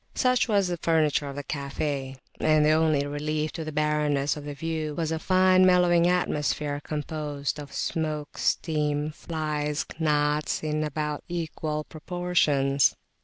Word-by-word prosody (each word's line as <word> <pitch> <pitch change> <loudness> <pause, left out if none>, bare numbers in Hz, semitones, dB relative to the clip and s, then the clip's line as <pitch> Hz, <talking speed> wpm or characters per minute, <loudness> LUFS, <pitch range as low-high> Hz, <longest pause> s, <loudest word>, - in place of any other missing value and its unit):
Such 255 -1 +2
was 200 -4 +2
the 175 -1 -2
furniture 155 -3 +1
of 140 - -7
the 145 - -5
cafe, 140 -1 -3 0.2
and 155 -1 +4
the 155 - +5
only 155 -2 +3
relief 150 +1 -2
to 165 - -5
the 155 - -5
barrenness 150 -1 +1
of 150 -1 -8
the 145 -1 -5
view 155 0 -3
was 160 -1 -1
a 160 - -1
fine 185 +1 +4
mellowing 180 -2 +5
atmosphere 150 -4 0
composed 150 -1 -3
of 145 -1 -8
smoke, 155 -2 -3
steam, 150 -1 0
[p.216] - - -19
flies, 150 -3 -2
and - - -12
gnats 150 -1 +1
in 155 0 -1
about 150 0 -3
equal 160 -3 -3
proportions. 150 -5 +1
150 Hz, 155 wpm, -26 LUFS, 145-160 Hz, 0.2 s, the